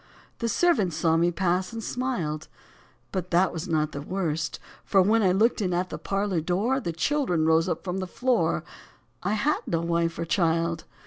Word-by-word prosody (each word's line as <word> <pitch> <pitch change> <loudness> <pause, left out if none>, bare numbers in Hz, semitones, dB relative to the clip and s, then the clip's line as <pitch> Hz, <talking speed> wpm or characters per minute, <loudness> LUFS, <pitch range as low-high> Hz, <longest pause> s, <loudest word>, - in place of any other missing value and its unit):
The 230 - -1
servants 220 - +2
saw 160 0 +2
me 170 +1 +3
pass 180 +1 0
and 225 -1 -6
smiled. 175 -14 -2 0.6
But 185 -2 -3
that 180 +2 +3
was 165 +3 -4
not 155 -2 0
the 140 - -5
worst, 165 -2 -2 0.2
for 195 - +3
when 215 +5 +4
I 190 -3 +4
looked 220 +5 +2
in 180 -3 0
at 180 +1 -1
the - - -5
parlour 195 -3 -1
door 200 - +1
The 200 -10 -3
children 175 - 0
rose 160 +2 +3
up - - -2
from 180 0 -3
the 185 - -3
floor: 250 +5 +1 0.6
I 205 - 0
had 275 +8 +1
no 165 -1 0
wife 170 0 0
or 170 - -2
child. 165 -1 0
180 Hz, 190 wpm, -26 LUFS, 165-210 Hz, 0.6 s, when